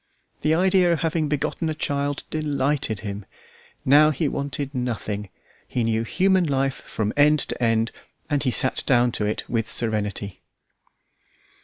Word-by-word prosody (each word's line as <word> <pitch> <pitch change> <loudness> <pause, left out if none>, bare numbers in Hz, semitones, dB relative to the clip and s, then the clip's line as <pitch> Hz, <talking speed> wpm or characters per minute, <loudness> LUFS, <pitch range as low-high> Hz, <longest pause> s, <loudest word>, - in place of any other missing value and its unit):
The 155 +1 +2
idea 185 0 +3
of 170 - 0
having 160 -1 0
begotten 150 +2 -1
a 155 - -2
child 145 -1 -1
delighted 145 -7 -1
him. 100 -1 -5 0.6
Now 150 +3 +6
he 155 +1 0
wanted 140 0 -3
nothing. 110 -5 -3 0.4
He 120 - -1
knew 115 0 +1
human 190 - +2
life 135 -2 0
from 105 -1 -3
end 150 +1 +5
to - - -4
end, 115 0 +2 0.4
and 145 -2 0
he 130 - +1
sat 130 +1 +1
down 120 -2 +4
to 105 -2 -1
it 105 - -3
with 115 -2 -1
serenity. 105 -3 -2
135 Hz, 150 wpm, -24 LUFS, 115-150 Hz, 0.6 s, Now